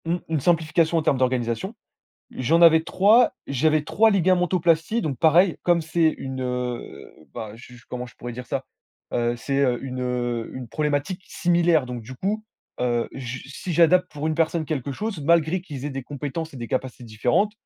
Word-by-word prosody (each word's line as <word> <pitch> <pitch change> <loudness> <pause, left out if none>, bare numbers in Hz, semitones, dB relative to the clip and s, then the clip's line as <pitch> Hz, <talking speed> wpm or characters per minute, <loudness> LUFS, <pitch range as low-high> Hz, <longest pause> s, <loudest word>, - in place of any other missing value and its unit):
Mmh. 170 +2 0
Une 160 -2 0
simplification 165 +1 +2
en - - +2
termes 140 - +2
d'organisation. 130 - -1 0.6
J'en 155 +7 +1
avais 160 -1 +7
3, 210 +8 +4
j'avais 150 +3 +1
3 220 +8 +3
ligamentoplasties 180 0 +2
donc 140 -5 -3
pareil, 170 +3 +4
comme 175 -1 +3
c'est 160 0 +2
une, 130 -1 -5
heu, 125 -1 -5 0.2
bah, 110 -2 -6
je 125 +2 -13
je 120 - -16
comment 125 0 -5
je 120 - -16
pourrais 120 0 -7
dire 125 +1 -8
ça? - - -3 0.5
Heu, 120 0 0
c'est 135 +3 -1
heu, 125 -3 +2
une, 130 -1 -5
heu, 120 -2 -2
une 130 -1 -6
problématique 150 - -2
similaire, 170 -5 +2
donc 125 -2 -6
du 125 +4 -9
coup, 210 +8 -2 0.4
heu, 120 -1 0
je 130 -1 -5
si 175 +6 -6
j'adapte 180 +3 +4
pour 150 +1 -4
une 160 - 0
personne 165 0 0
quelque 145 -4 -3
chose, 205 +5 -4
malgré 170 +3 +3
qu'ils 145 -7 -8
aient 145 - -2
des 135 0 -5
compétences 145 +4 -5
et - - -8
des 120 -2 -5
capacités 125 0 -3
différentes 120 - +1
150 Hz, 185 wpm, -24 LUFS, 125-170 Hz, 0.6 s, avais